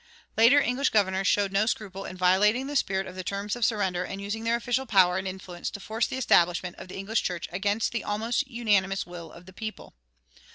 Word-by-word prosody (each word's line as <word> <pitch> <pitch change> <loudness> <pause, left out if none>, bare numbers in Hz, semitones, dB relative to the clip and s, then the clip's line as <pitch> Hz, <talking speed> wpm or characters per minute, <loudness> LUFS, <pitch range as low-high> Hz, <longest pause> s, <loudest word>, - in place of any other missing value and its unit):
Later 235 +6 +6
English 275 0 +1
governors 195 -2 +1
showed 200 -1 +2
no 200 +2 +2
scruple 195 -4 -3
in 185 - -7
violating 205 +7 +3
the 290 +1 -5
spirit 190 -7 +1
of 185 - -8
the 185 0 -6
terms 200 +3 -3
of 240 - -4
surrender 195 -6 +1
and 195 +2 -6
using 205 +3 -4
their 230 +1 +2
official 245 +2 -1
power 185 -4 +4
and 190 - -4
influence 185 -2 -6
to - - -8
force 220 +3 -1
the - - -4
establishment 175 -7 +2
of - - -9
the 185 - -8
English 210 +4 -1
church 175 -2 -3
against 205 +4 0
the 235 - -3
almost 230 +6 -1
unanimous 205 -6 +1
will 175 -2 -9
of 170 +1 -14
the 190 - -14
people. 215 +3 -7
200 Hz, 215 wpm, -27 LUFS, 185-225 Hz, -, Later